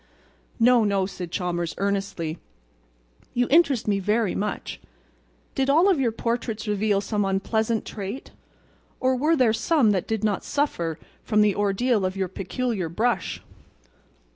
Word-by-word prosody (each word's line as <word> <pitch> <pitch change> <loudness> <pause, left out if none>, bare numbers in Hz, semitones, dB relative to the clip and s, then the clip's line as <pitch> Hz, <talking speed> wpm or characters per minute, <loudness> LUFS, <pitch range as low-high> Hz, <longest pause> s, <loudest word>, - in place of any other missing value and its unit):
"No, 240 0 +5
no," 200 -2 +1
said 180 -2 -6
Chalmers, 175 -2 -2
earnestly, 195 -5 -2 1.0
"you 245 0 +3
interest 285 -8 +4
me 200 -1 +2
very 210 +1 +1
much. 210 +1 -4 0.7
Did 270 0 0
all 325 +7 +5
of 375 -7 +3
your 245 -4 +2
portraits 230 -1 -3
reveal 205 -1 +1
some 205 0 -1
unpleasant 220 +3 0
trait, 205 +5 -6 0.7
or 260 0 +2
were 300 +6 +2
there 250 -6 +3
some 235 0 +3
that 190 -3 -1
did 220 -1 -2
not 210 -3 0
suffer 170 - -1 0.3
from 215 -2 +2
the 210 -1 +4
ordeal 205 +2 +1
of 185 +1 -1
your 190 -2 -1
peculiar 195 0 -3
brush?" 225 +8 -1
210 Hz, 140 wpm, -25 LUFS, 195-245 Hz, 1.0 s, No